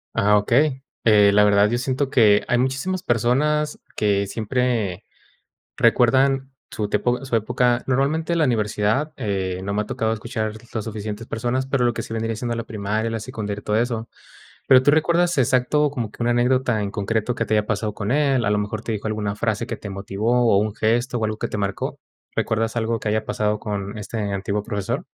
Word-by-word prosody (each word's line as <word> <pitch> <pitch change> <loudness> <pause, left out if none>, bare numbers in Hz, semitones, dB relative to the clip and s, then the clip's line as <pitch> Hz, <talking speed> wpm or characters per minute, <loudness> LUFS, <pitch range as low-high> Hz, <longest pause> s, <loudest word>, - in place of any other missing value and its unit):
Ah, 105 -1 +4
okey. 135 +6 +2 0.2
Eh, 105 -2 +6
la 105 +1 +5
verdad, 105 0 +4
yo 120 - 0
siento 130 +2 -1
que 105 -5 +5
hay 125 - +2
muchísimas 135 +9 -1
personas 150 +6 +1 0.2
que 100 -1 +1
siempre 110 -3 -1 0.7
recuerdan 135 +2 +3 0.2
su 105 -3 -3
tiempo 125 +1 0
su 120 - -1
época. 120 +2 +1
Normalmente, 150 +6 0
la 160 -2 +3
universidad, 110 +5 0
eh, 95 -5 -2
no 100 +1 -3
me 105 - +1
ha - - -10
tocado 110 +1 -1
escuchar 110 -1 -3 0.2
las 110 -3 -2
suficientes 110 0 -6
personas, 125 +3 -2
pero 135 -3 +1
lo 120 - +2
que - - -3
sí - - -10
vendría 115 0 -2
siendo 120 +1 -3
la 115 - -3
primaria, 110 +2 -2
la 115 - -2
secundaria, 105 -3 -5
y - - -29
todo 105 - -1
eso. 115 -1 -1 0.6
Pero, 130 -1 +7
¿tú 145 - +4
recuerdas 170 +2 +2
exacto 135 +3 +2
como 120 -7 -3
que 120 - -5
una 120 - +2
anécdota 120 -2 +2
en 100 - -2
concreto 110 +3 -1
que 115 - -1
te - - -1
haya 105 0 +2
pasado 105 -1 -1
con 105 +3 -3
él? 140 -4 +2
¿A - - +1
lo 105 - +2
mejor 105 +1 -3
te 115 - -2
dijo 105 +1 -5
alguna 105 -1 -2
frase 110 -1 -1
que - - -4
te 100 - -8
motivó, 110 +5 +1
o - - +5
un 105 0 -1
gesto, 120 +3 +1
o 110 - 0
algo 110 0 -3
que - - -3
te - - -4
marcó? 100 -1 -3 0.4
¿Recuerdas 110 +1 0
algo 115 0 0
que 105 - -2
haya 110 0 0
pasado 105 0 -1
con 100 -1 -4
este 110 +2 -6
antiguo 100 0 -2
profesor? 105 -4 -3
115 Hz, 205 wpm, -22 LUFS, 105-125 Hz, 0.7 s, Pero